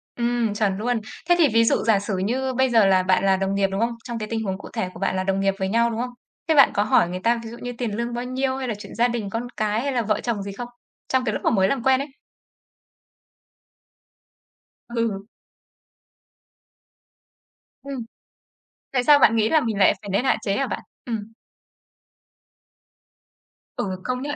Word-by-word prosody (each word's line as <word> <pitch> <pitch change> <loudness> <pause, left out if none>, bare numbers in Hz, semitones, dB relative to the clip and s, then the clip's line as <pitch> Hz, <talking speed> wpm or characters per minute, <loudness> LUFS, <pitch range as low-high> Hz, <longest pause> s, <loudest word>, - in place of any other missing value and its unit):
Ừm, 235 -2 0
chuẩn 205 -2 0
luôn. 235 +2 -1 0.3
Thế 350 - +6
thì 330 -4 +5
ví 230 0 +5
dụ 230 - +2
giả 220 -3 +3
sử 200 -1 -3
như 255 +7 -1
bây 260 +1 +2
giờ 225 -4 +5
là 190 -1 +4
bạn 185 +1 +2
là 190 -1 +4
đồng 195 +1 -1
nghiệp, 200 0 +2
đúng 195 - -2
không? 235 +1 +1
Trong 235 -2 -5
cái 215 - -4
tình 225 -1 -2
huống 190 -2 -2
cụ - - -10
thể 185 - -2
của - - -11
bạn 195 -1 0
là 185 - 0
đồng 195 0 0
nghiệp 195 0 +2
với 190 0 -1
nhau, 235 +3 +2
đúng 225 -1 -4
không? 250 - -3 0.4
Thế 320 - +3
bạn 275 - +7
có 205 - +2
hỏi 175 -4 +3
người 180 +1 -4
ta 235 +1 +2
ví 225 - -7
dụ 235 - -9
như 245 0 -5
tiền 235 -3 -2
lương 235 +1 -2
bao 240 +1 -3
nhiêu 260 +1 -1
hay 265 -1 -3
là 235 - -1
chuyện 205 - -10
gia 235 +2 +3
đình, 235 -4 -3
con 230 +4 -3
cái 215 +1 0
hay 280 +2 -1
là 250 -2 +1
vợ 215 -2 0
chồng 225 -5 -2
gì 200 - -5
không 240 +5 -6 0.4
trong 260 -1 +1
cái 215 - 0
lúc - - -4
mà - - +3
mới 190 -4 +3
làm 245 +3 -1
quen 265 0 +4
ấy? 280 - -5 2.8
Ừ. 230 -4 -2 2.6
Ừm, 270 -4 -6 0.9
tại 250 -2 +1
sao 295 +1 +7
bạn 230 -4 +5
nghĩ 220 -1 +3
là 315 - +5
mình 225 -6 -2
lại 195 - +5
phải 205 - -9
nên 200 +6 +1
hạn 265 - +2
chế 200 -1 0
hả 275 - 0
bạn? - - -4 0.2
Ừm. 225 -2 -5 2.4
Ừ, 185 -2 -3
công 250 0 -2
nhận 290 +2 -3
230 Hz, 215 wpm, -23 LUFS, 200-245 Hz, 2.8 s, bạn